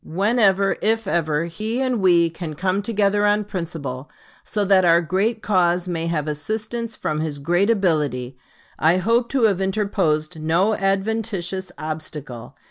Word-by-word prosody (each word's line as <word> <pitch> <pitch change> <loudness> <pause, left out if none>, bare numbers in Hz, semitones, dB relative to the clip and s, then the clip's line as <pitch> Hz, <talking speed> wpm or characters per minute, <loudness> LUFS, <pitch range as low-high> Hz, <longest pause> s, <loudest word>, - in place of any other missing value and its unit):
Whenever, 195 +1 +2
if 225 +1 +1
ever, 165 -3 0
he 215 +8 -3
and 255 -4 0
we 175 -2 +5
can 165 -1 -6
come 185 +4 0
together 205 -1 +1
on 210 0 +3
principle 165 -9 -6 0.3
so 210 -1 -1
that 190 -1 +4
our 170 -1 +5
great 195 +7 -1
cause 180 -2 +2
may 165 -2 -2
have 155 -3 -1
assistance 220 +9 -4
from 155 0 -2
his 155 -2 -3
great 175 +8 +1
ability, 150 - 0 0.4
I 165 +3 +4
hope 230 +5 +1
to 265 -3 0
have 200 -4 +3
interposed 185 -5 0
no 170 +7 +2
adventitious 195 -2 -2
obstacle. 155 -6 -6
185 Hz, 145 wpm, -22 LUFS, 160-210 Hz, 0.4 s, we